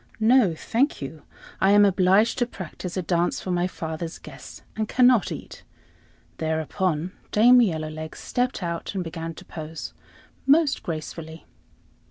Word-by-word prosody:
"No, 220 -6 +4
thank 245 - 0
you; 150 +2 -7 0.4
I 190 - +4
am 205 0 +7
obliged 195 +4 +3
to 245 - +1
practise 185 -3 -7
a 185 - -1
dance 175 0 0
for 185 - -4
my 175 0 +1
father's 160 -1 -5
guests, - - -12
and 215 -1 -2
cannot 250 -5 +4
eat." - - -8 0.8
Thereupon 160 +2 -1 0.2
Dame 245 +4 +6
Yellowlegs 155 -5 -2
stepped 245 -5 -2
out, 170 +3 -4
and 185 - -1
began 165 0 -6
to - - -12
pose 160 0 -7 0.5
most 295 0 +4
gracefully. 160 0 -6
180 Hz, 140 wpm, -25 LUFS, 160-220 Hz, 0.8 s, am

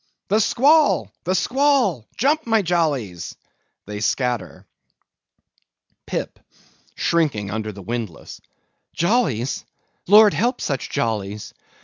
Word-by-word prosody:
The 210 +3 +3
squall! 285 +8 +3
the 185 +2 +1
squall! 250 - +1
jump, 285 +5 +1
my 225 -2 +3
jollies! 140 - -1 0.5
(They 105 0 -6
scatter.) 120 -2 -2 1.4
PIP - - -4 0.6
(shrinking 140 - 0
under 110 0 -3
the 100 -1 -11
windlass). 110 -5 -6 0.5
Jollies? 160 - 0 0.4
Lord 210 +2 +7
help 245 +3 0
such 135 -3 -3
jollies! 105 -2 -3
155 Hz, 95 wpm, -21 LUFS, -, 1.4 s, Lord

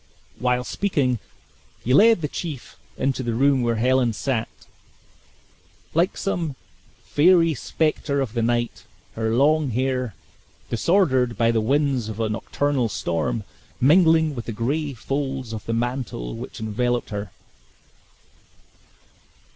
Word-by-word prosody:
While 125 +1 +1
speaking 135 - 0 0.6
he 125 - +1
lead 220 +3 +6
the - - +1
chief 145 -4 -6 0.2
into 135 0 0
the 120 -3 -2
room 135 +1 +3
where 120 -1 +1
Helen 125 +1 +2
sat, 115 +1 -2 1.4
like 170 +4 +1
some 170 -7 -2 0.5
fairy 165 +1 +4
specter 150 0 -1
of 130 -6 -2
the 120 - 0
night; 120 0 -1 0.3
her 110 0 -1
long 150 +2 +3
hair, 125 -2 -1 0.6
disordered 130 - +2
by 115 0 +3
the 115 -1 +1
winds 135 -1 +1
of 110 0 -6
a 110 -1 0
nocturnal 125 +3 -1
storm, 85 +4 -2 0.4
mingling 160 +2 +5
with 120 -4 -6
the 115 - -4
gray 140 +6 -2
folds 135 -1 -3
of 110 - -7
the - - -1
mantle 120 - -3
which - - -8
enveloped 120 +3 -1
her. 100 0 -4
125 Hz, 125 wpm, -23 LUFS, 115-145 Hz, 1.4 s, lead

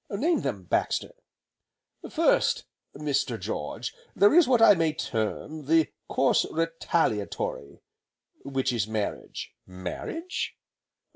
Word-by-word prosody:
"Name 295 - +1
them, 105 -9 -3
Baxter." 90 - 0 1.0
"First, - - +2 0.3
Mr. 145 -2 -1
George, - - -4 0.2
there 205 - +6
is 340 -3 +7
what 250 -2 +4
I 225 -2 +8
may 165 -4 +1
term, 115 +6 -3
the 160 -1 +4 0.2
Course - - +3
Retaliatory, 160 - -1 0.6
which 135 -2 -1
is 110 -3 0
Marriage 110 -2 -4
" - - -56
"Marriage?" 95 - -5
150 Hz, 110 wpm, -27 LUFS, -, 1.0 s, I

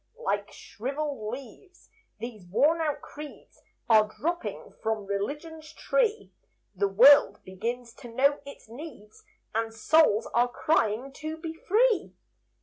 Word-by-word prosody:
Like 205 +1 -2
shriveled 270 -2 -5
leaves, 275 - -11 0.3
these 215 -4 -8
worn 290 - +3
out 300 -2 -1
creeds 300 -2 -11 0.3
Are 215 -2 +5
dropping 345 +2 -3
from 220 -2 -2
Religion's 300 +11 -5
tree; 455 -3 0 0.4
The 200 +2 +1
world 255 +9 +7
begins 230 +5 -5
to - - -10
know 280 +4 +3
its 280 -4 -12
needs, 235 -4 -11 0.3
And 225 +1 -1
souls 225 0 +3
are 240 +1 +4
crying 265 -4 0
to 310 +1 -4
be 320 0 -6
free. 430 +6 +1
265 Hz, 125 wpm, -27 LUFS, 220-315 Hz, 0.4 s, world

